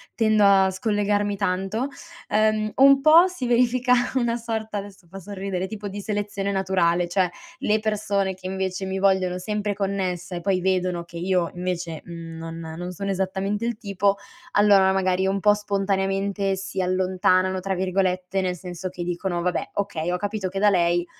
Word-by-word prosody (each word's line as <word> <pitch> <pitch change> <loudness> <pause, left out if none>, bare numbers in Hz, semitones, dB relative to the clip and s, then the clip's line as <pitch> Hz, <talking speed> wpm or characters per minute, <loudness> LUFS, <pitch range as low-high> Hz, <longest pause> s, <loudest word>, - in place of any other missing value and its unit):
tendo 215 -2 +3
a 195 -1 +5
scollegarmi 205 +1 0
tanto, 195 +5 -1 0.4
uhm, 215 0 +2
un 275 0 +6
po' 320 +5 +7
si 360 -9 -5
verifica 250 +1 +3 0.2
una 240 -2 +1
sorta 220 -2 -4
adesso 200 -2 -8
fa 195 +3 -9
sorridere, 190 -1 -4
tipo 210 0 -6
di 200 +1 -6
selezione 200 -1 -2
naturale, 180 -2 +1
cioè 185 0 +2 0.3
le 215 +1 +1
persone 205 -2 -1
che 185 0 -8
invece 190 0 -3
mi 190 0 -3
vogliono 190 -2 +2
sempre 210 +2 -2
connessa 190 -3 -2
e 175 - -4
poi 185 0 +1
vedono 185 -2 0
che 170 0 -11
io, 180 -1 0
invece, 175 -3 -3
mhmm, 165 -1 -8
non 165 0 -7
non 180 +1 -5
sono 200 +3 -5
esattamente 195 +3 -2
il 235 -2 -2
tipo, 200 -2 0 0.4
allora 200 -2 +5
magari 190 0 +1
un 195 +1 0
po' 210 +1 +5
spontaneamente 195 -1 -1
"si 190 0 -4
allontanano", 185 0 +1
tra 190 +1 -2
virgolette, 185 0 0
nel 180 -1 -1
senso 180 +1 -6
che 175 -1 -6
dicono: 175 0 -2
"Vabbè 180 +1 -2
okay, 175 -4 -2
ho 180 - 0
capito 205 0 -3
che 195 +1 -4
da 210 +1 +5
lei 175 -2 +2
195 Hz, 170 wpm, -24 LUFS, 180-205 Hz, 0.4 s, po